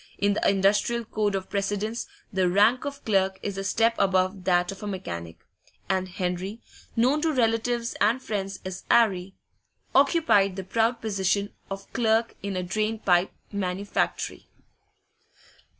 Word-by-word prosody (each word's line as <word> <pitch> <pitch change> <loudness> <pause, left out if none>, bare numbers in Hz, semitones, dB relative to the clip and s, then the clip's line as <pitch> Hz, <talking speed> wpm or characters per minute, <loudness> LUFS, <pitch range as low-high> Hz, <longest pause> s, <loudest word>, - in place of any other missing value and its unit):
In 200 0 +2
the - - +2
industrial 205 +4 +2
code 210 -2 -1
of 190 -1 -4
precedence 205 +3 -2 0.3
the 185 -1 +2
rank 210 +8 +4
of 280 0 -6
clerk 190 -3 +2
is 200 - -3
a 195 - -3
step 225 +3 +2
above 185 0 +1
that 180 -1 +2
of 195 - -10
mechanic, 85 - -6 0.5
and 185 0 0
Henry 185 +3 -3 0.4
known 260 +6 +3
to 325 0 +2
relatives 235 -2 +1
and 225 +5 +3
friends 195 -5 -4
as 185 0 -6
'Arry 195 -5 +3 0.6
occupied 275 - +4
the 190 - -4
proud 230 +4 +1
position 200 -1 0 0.2
of 195 0 -6
clerk 225 -1 +2
in 200 -1 -4
a 180 - -1
drain 215 +4 -1
pipe 180 -3 +2 0.2
manufactory. 200 0 -2
200 Hz, 140 wpm, -26 LUFS, 190-225 Hz, 0.6 s, rank